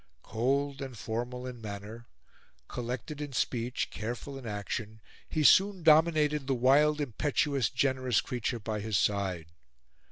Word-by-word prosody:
Cold 135 +5 -1
and 130 -3 -6
formal 120 +3 -4
in 125 -2 -7
manner, 105 +2 -8 0.6
collected 125 +5 -5
in 145 -2 -5
speech, 125 0 -1
careful 120 +5 -5
in 135 -3 -8
action, 105 +1 -4 0.3
he 155 - 0
soon 190 +3 +5
dominated 155 -2 +4
the 135 - +1
wild, 145 +5 +4
impetuous, 140 -1 0
generous 130 -2 +1
creature 120 0 -2
by 110 -1 -4
his 105 -1 0
side. 95 -6 -1
125 Hz, 130 wpm, -30 LUFS, 110-145 Hz, 0.6 s, soon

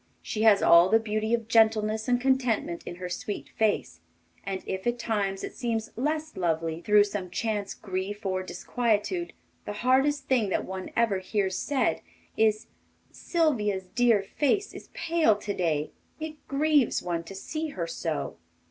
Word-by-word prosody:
She 215 - -3
has 215 -3 +5
all 170 +2 +7
the 225 - +6
beauty 215 0 -2
of 230 -2 -6
gentleness 220 -1 +3
and 245 -1 +3
contentment 250 -9 +1
in 175 - -5
her 180 0 -6
sweet 190 +3 -5
face; 205 - 0 0.4
and 190 -1 -4
if 190 +4 -4
at 240 0 +1
times 205 -4 -1
it - - -5
seems 225 -3 -2
less 305 +5 -2
lovely 165 -2 -1
through 210 +2 +5
some 205 -3 -4
chance 210 0 -2
grief 195 +2 -5
or 185 -1 0
disquietude, 235 - -1 0.3
the 205 - -4
hardest 270 +2 +3
thing 245 -7 +2
that - - -1
one 190 0 -6
ever 225 -5 +2
hears 190 0 -1
said 275 +5 0 0.3
is: 215 0 +2 0.5
'Sylvia's 220 - 0
dear 235 -5 +4
face 300 - 0
is - - -11
pale 325 -9 +3
to 205 0 -4
day. 155 -5 -1 0.3
It 310 -1 -7
grieves 290 -1 +2
one 170 -2 -2
to 195 - -9
see 310 +11 -4
her 185 - -4
so. 165 -2 -3
215 Hz, 160 wpm, -27 LUFS, 190-250 Hz, 0.5 s, all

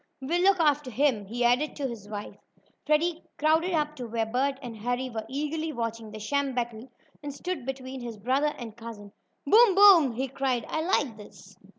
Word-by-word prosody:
"We'll 325 +7 0
look 385 0 +4
after 295 -4 +2
him," 245 -4 +1
he 240 +5 -3
added 250 +6 +2
to 280 -2 -2
his 215 -4 -8
wife. 210 -1 -6 0.5
Freddie 325 +2 +2 0.2
crowded 320 +4 +2
up 300 -1 0
to 245 -2 -5
where 225 0 -1
Bert 265 +5 0
and 245 -4 -8
Harry 245 +3 -2
were 220 -1 -5
eagerly 300 +4 -2
watching 230 -3 -4
the 215 - -9
sham 275 +4 -1
battle, 240 0 -4 0.3
and 290 -1 -5
stood 280 -1 -5
between 265 -1 -5
his 235 -2 -6
brother 265 +8 0
and 230 -4 -8
cousin. 225 -3 -10 0.3
"Boom! 430 +5 +6
Boom!" 375 - +7
he 260 +4 -2
cried. 260 -3 -1
"I 315 - -2
like 290 - 0
this!" 200 -2 -14
260 Hz, 190 wpm, -27 LUFS, 230-300 Hz, 0.5 s, Boom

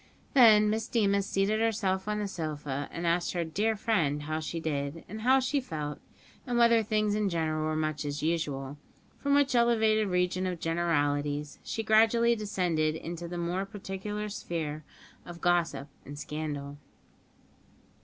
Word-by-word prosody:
Then 215 -6 +7
Miss 220 +1 -1
Deemas 200 -4 +1
seated 200 +3 +1
herself 205 -4 0
on 210 0 -1
the 210 -1 -2
sofa, 150 -6 -4
and 170 - -4
asked 170 +1 +1
her 175 -1 0
"dear 210 +7 0
friend" 165 -10 0
how 155 +1 -2
she 165 +1 -4
did, 145 0 -3
and 215 +3 -7
how 260 +3 +5
she 265 +2 0
felt, 150 - -5 0.5
and 245 -1 0
whether 235 -1 +5
things 215 -1 0
in 210 -1 +1
general 155 -2 -1
were 155 0 -1
much 155 -1 -1
as 145 0 -4
usual; 145 -4 -2 0.4
from 280 0 +2
which 285 -2 +3
elevated 220 -3 +3
region 180 0 0
of 180 -2 -3
generalities 145 -3 -1
she 225 - -3
gradually 225 +2 +4
descended 175 -7 0
into 170 +1 -6
the 175 +1 -5
more 175 +2 -1
particular 205 +1 -5
sphere 155 -6 -4 0.4
of 175 -1 -10
gossip 170 -6 +1 0.2
and 145 +2 -9
scandal. 145 -2 -5
175 Hz, 155 wpm, -29 LUFS, 155-215 Hz, 0.5 s, Then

